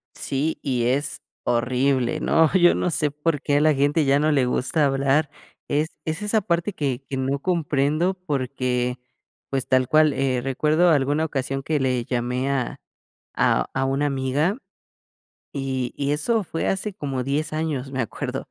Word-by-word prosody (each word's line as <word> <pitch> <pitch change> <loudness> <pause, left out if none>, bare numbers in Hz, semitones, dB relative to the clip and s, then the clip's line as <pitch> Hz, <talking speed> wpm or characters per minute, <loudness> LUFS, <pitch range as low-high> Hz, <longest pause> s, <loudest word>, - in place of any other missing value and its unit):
Sí, 145 +4 -2
y 125 -4 0
es 135 +4 -1 0.2
horrible, 130 +4 +1
¿no? 160 0 +3
Yo 175 -2 +5
no - - 0
sé 150 -1 +1
por 150 0 -1
qué 145 -1 +1
a - - +3
la 155 0 +4
gente 145 +3 +2
ya 140 +1 +3
no 155 +1 +2
le 135 -3 +3
gusta 130 +5 +1
hablar. 140 +2 +2 0.4
Es 150 +2 0 0.2
es 160 +4 -3
esa 210 +1 +1
parte 175 +2 -1
que 140 -6 -2
que 135 - -3
no 135 +2 -1
comprendo 155 +1 +1
porque 125 -3 -1 0.5
pues, 135 -1 -2
tal 130 -1 +3
cual, 155 -1 +4
eh, 130 -2 0
recuerdo 150 +6 +2
alguna 145 0 +2
ocasión 135 -2 -2
que 155 +1 0
le 125 -3 0
llamé 125 +2 -1
a 130 -3 -2 0.6
a - - +2
a 135 - 0
una 135 +2 +1
amiga, 140 - 0 1.0
y 130 -3 -2
y 140 0 0
eso 215 +8 +1
fue 165 - -2
hace 195 +2 -1
como 135 -8 -3
10 150 +3 -1
años, 155 -4 -2
me 130 -1 -2
acuerdo. 115 - -4
140 Hz, 170 wpm, -23 LUFS, 130-155 Hz, 1.0 s, Yo